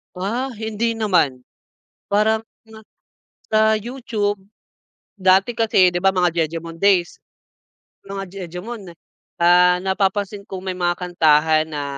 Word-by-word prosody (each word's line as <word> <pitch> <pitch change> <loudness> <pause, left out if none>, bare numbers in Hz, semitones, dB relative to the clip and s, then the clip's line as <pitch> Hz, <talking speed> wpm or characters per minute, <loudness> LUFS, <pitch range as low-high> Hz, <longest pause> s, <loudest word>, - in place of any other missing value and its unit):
Ah, 225 +8 -2
hindi 220 +1 -2
naman. 170 - +1 0.7
Parang, 220 +2 +2 0.3
ah, 220 - -13 0.7
sa 215 - +4 0.2
YouTube. 215 -3 -3 0.8
Dati 190 +4 +3
kasi, 205 -5 +4
'di - - 0
ba, 195 0 +3
mga 180 -2 +1
jejemon 165 +1 -7
days. 190 -2 +2 0.9
Mga 195 0 -5 0.3
jejemon, 190 0 -8 0.5
ah, 180 +1 +5
napapansin 195 +1 -1
ko 190 -1 -7
may 190 0 -4
mga 175 -1 0
kantahan 160 -3 +2
na 145 -2 -4
190 Hz, 115 wpm, -20 LUFS, 175-215 Hz, 0.9 s, ah